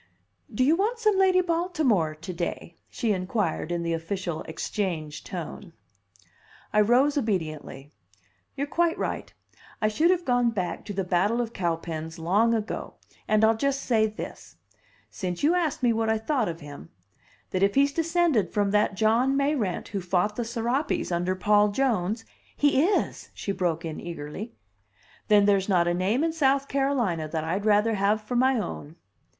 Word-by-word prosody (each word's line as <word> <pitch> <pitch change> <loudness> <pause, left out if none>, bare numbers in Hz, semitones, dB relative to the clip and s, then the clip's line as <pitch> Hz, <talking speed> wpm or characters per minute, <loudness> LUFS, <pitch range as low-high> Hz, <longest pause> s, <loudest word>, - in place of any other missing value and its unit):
"Do 235 +4 +1
you 300 +5 +4
want 430 +7 0
some 430 -3 +2
Lady 380 -1 +4
Baltimore 315 - +1
to 160 +4 -7
day?" 170 0 -4
she 230 - -1
inquired 185 -3 -2
in 170 -1 -1
the 170 0 -1
official 165 0 -3
Exchange 160 -2 -3
tone. - - -7 1.0
I 210 - +5
rose 260 +7 +3
obediently. 155 - -3 0.6
"You're 280 - -1
quite 335 +3 +1
right, - - -3 0.5
I 215 - +2
should 310 +11 +2
have 360 -1 +2
gone 245 -2 +3
back 185 -7 -3
to 205 - -5
the 195 0 -1
battle 185 +6 +1
of 235 -1 -2
Cowpens 165 -2 -3
long 205 +8 +2
ago, 215 -1 -4 0.3
and 215 0 +3
I'll 225 +1 +4
just 275 +4 -1
say 220 -3 +2
this 215 - -9 0.6
since 180 0 -4
you 310 +4 +4
asked 330 -7 -1
me 240 -2 +4
what 225 0 0
I 220 - +2
thought 235 - 0
of 165 -1 -6
him 145 - -10 0.6
that 185 - -1
if 200 0 +3
he's 280 +1 +3
descended 330 - +1
from 205 -1 +1
that 210 -1 +2
John 230 +6 +2
Mayrant 275 - -1
who 200 -2 -3
fought 180 +3 0
the 240 - -2
Serapes 240 +2 -1
under 175 +2 0
Paul 210 +2 +4
Jones 220 -2 0 0.2
" - - -35
"He 290 -2 +3
is!" 400 - -1
she 200 - -3
broke 175 -3 -1
in 160 -1 -5
eagerly. 170 +6 -7 0.7
"Then 205 -1 +5
there's 200 -1 +2
not 175 -3 +3
a 175 - +2
name 195 - +1
in 325 -1 0
South 275 -3 +2
Carolina 250 - 0
that 155 0 -3
I'd 185 +6 -2
rather 210 +2 +4
have 205 +1 +2
for 215 +3 -5
my 260 +1 +3
own." 160 -7 -5
210 Hz, 170 wpm, -26 LUFS, 180-270 Hz, 1.0 s, I